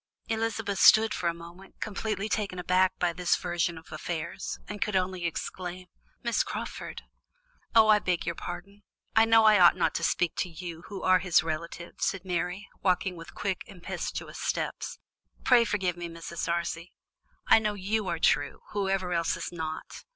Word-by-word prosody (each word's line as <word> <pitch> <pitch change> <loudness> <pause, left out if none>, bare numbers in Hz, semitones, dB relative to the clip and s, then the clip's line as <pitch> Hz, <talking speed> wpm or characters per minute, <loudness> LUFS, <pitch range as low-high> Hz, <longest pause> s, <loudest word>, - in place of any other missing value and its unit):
Elizabeth 225 -3 -1
stood 220 0 +7
still - - -4
for 170 - +1
a - - -1
moment, 185 +3 -15
completely 210 -1 -2
taken 205 -4 -2
aback 185 +1 +3
by 175 -1 +1
this 175 +1 +2
version 175 -1 -1
of 160 - -13
affairs, 170 -1 -4
and 205 0 -7
could 210 - 0
only 185 -1 0
exclaim: 180 +2 -5 0.4
"Miss 235 -1 +2
Crawford!" - - -5 0.7
"Oh, 220 -1 +8
I 215 -1 +6
beg 180 -3 -1
your 170 - -1
pardon; 190 +4 -8 0.3
I 225 0 +7
know 225 0 +6
I 215 -2 +7
ought 175 -1 +8
not 175 - +2
to - - -2
speak 175 -2 +1
to 180 - -1
you, 170 0 -8
who 200 -2 -7
are 185 0 +5
his 180 -3 +3
relative," 170 +2 -5
said 195 -1 -1
Mary, 180 +2 -2
walking 185 0 +1
on - - -12
with 160 -4 -11
quick 195 -2 -2
impetuous 185 -5 -5
steps. - - -2 0.5
"Pray 245 -2 +6
forgive 190 -6 0
me, 175 -1 -5
Mrs. 165 0 -5
Darcy; 170 0 -2 0.5
I - - +7
know 210 -1 -1
you 205 +1 -1
are 170 -1 -1
true, 145 -3 +2
who 200 -2 -1
ever 185 -2 0
else 170 +1 +1
is 170 - -5
not. 160 -2 -6
180 Hz, 180 wpm, -28 LUFS, 170-205 Hz, 0.7 s, Oh